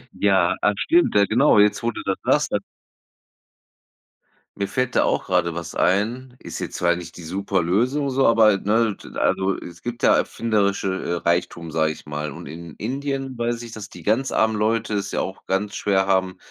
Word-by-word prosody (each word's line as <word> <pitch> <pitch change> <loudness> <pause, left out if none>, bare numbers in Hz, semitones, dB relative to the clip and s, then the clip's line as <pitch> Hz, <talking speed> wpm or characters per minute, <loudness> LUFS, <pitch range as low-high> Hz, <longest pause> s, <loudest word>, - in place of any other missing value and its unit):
Ja, 95 -3 +3
ah, 105 - +3
stimmt, 345 +1 +2
ja, 100 - +5
genau, 120 +5 +4
jetzt, 105 0 +4
wo 120 - 0
du - - -5
das 95 -1 0
sagst, - - +2
dass - - 0 2.0
Mir 100 -1 -1
fällt 125 +3 -2
da - - +4
auch - - 0
grade 85 -2 +1
was 85 -1 -6
ein, 120 +6 0
ist - - -8
jetzt - - -5
zwar 85 0 +2
nicht 85 0 -9
die 85 - -9
Superlösung 100 - 0
so, 135 -1 +3
aber, 110 -3 +5
ne 110 +1 +1 0.2
also, 95 0 +1
es 85 0 -10
gibt 120 0 -6
ja - - +6
erfinderische, 100 -4 0
äh, 85 - -2
Reichtum, 85 -1 -1
sage 80 0 +1
ich 80 - -11
mal, 75 0 -4
und - - -9
in 80 +2 -9
Indien 135 +2 -3
weiß 120 0 -2
ich, 115 - -9
dass 105 -2 -8
die - - -12
ganz 120 +5 +1
armen 110 0 +2
Leute 110 +1 0
es 100 -1 -2
ja - - -1
auch 95 - -7
ganz 100 +2 -1
schwer 95 -2 +1
haben, 95 -1 +1
100 Hz, 195 wpm, -22 LUFS, 90-115 Hz, 2.0 s, ja